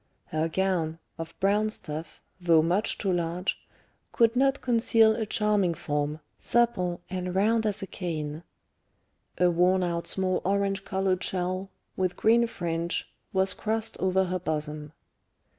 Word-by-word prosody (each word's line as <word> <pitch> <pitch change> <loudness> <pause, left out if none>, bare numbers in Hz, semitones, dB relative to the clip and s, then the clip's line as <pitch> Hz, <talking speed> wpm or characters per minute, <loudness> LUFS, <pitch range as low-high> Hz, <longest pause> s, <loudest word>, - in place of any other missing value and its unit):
Her 155 +1 0
gown, 170 -3 0 0.2
of 165 0 -7
brown 205 +3 +2
stuff, 160 -6 -6 0.2
though 165 -3 +4
much 180 +6 +1
too 195 -3 0
large, 175 +1 -1 0.6
could 230 0 +3
not 270 +2 +3
conceal 225 -2 +4
a 220 -2 -2
charming 210 -5 +1
form, 150 -1 -2 0.2
supple 185 -8 +1
and 180 -1 -3
round 220 +3 +3
as 205 -1 -2
a - - -2
cane; 155 -5 -4 1.0
a 180 0 +4
worn 180 +2 +3
out 170 -1 -2
small 185 -1 0
orange 195 0 0
coloured 190 -2 0
shawl, 185 +1 -2 0.3
with 185 -1 -1
green 235 +2 +4
fringe, 170 -5 -3 0.2
was 190 0 +2
crossed 220 +1 -2
over 190 0 +2
her 185 0 -2
bosom. 150 -2 -3
185 Hz, 140 wpm, -27 LUFS, 170-210 Hz, 1.0 s, though